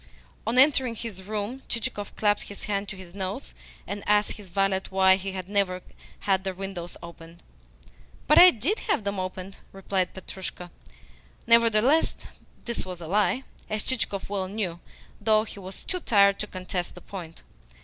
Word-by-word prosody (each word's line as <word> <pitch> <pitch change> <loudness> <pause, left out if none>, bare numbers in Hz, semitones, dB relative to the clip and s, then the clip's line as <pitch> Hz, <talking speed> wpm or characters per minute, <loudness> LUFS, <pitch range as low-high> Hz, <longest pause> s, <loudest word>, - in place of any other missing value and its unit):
On 235 +2 +1
entering 260 -3 +5
his 215 -4 -6
room, 210 +6 -4
Chichikov 230 -4 -2
clapped 210 -1 +2
his 200 - -8
hand 200 -1 -2
to - - -6
his 180 -2 -11
nose, 185 - -4 0.3
and 200 +2 -5
asked 210 0 +4
his 205 -3 -9
valet 195 +1 +1
why 190 0 +5
he 195 0 -5
had 185 -1 -5
never 195 -3 0 0.4
had 190 -1 +2
the 190 -1 -3
windows 185 -3 -5
opened. 170 0 -12 0.8
"But 300 - +7
I 360 +1 +11
did 300 - 0
have 230 - +2
them 200 -1 -2
opened," 185 +1 -5
replied 190 -1 -1
Petrushka. 185 -1 -7 0.7
Nevertheless 230 +5 +5 0.5
this 235 -1 -2
was 185 -2 -6
a 170 - -7
lie, 210 +9 +2 0.3
as 215 -1 -1
Chichikov 210 -6 -1
well 195 -2 -2
knew, 185 -4 -3 0.4
though 215 0 +4
he 210 - -9
was 190 0 -9
too 365 - -1
tired 200 - +4
to 210 - -2
contest 185 -2 -4
the - - -11
point. 170 -5 -9
200 Hz, 165 wpm, -27 LUFS, 185-215 Hz, 0.8 s, I